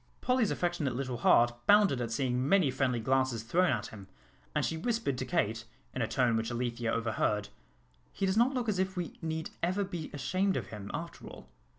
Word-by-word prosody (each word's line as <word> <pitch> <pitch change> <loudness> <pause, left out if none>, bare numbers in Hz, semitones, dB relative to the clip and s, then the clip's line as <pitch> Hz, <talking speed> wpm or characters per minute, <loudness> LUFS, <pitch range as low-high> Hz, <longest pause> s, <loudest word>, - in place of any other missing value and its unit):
Polly's 250 -4 +2
affectionate 170 -8 -1
little 130 -1 -3
heart 120 +1 +5
bounded 205 -11 +5
at 120 - -2
seeing 125 +2 0
many 185 -8 +4
friendly 125 -2 0
glances 130 -1 +1
thrown 175 +10 +2
at 105 -4 0
him, 100 -3 -11 0.5
and - - +2
she 160 - -1
whispered 225 - -1
to - - -2
Kate, 115 -10 0 0.3
in 130 - -3
a 110 - +1
tone 120 -1 +2
which 115 0 -1
Alethea 120 -1 -2
overheard, 105 -2 0 0.6
"He 195 - -2
does 190 - +2
not 240 +4 +4
look 245 -2 -1
as 200 -4 0
if 190 0 -1
we 175 -2 -4
need 160 -1 -3
ever 185 +4 +1
be 175 -5 -5
ashamed 185 +7 0
of - - -5
him, 105 -2 -7
after 165 +3 -6
all." 65 - -12
135 Hz, 200 wpm, -31 LUFS, 120-185 Hz, 0.6 s, heart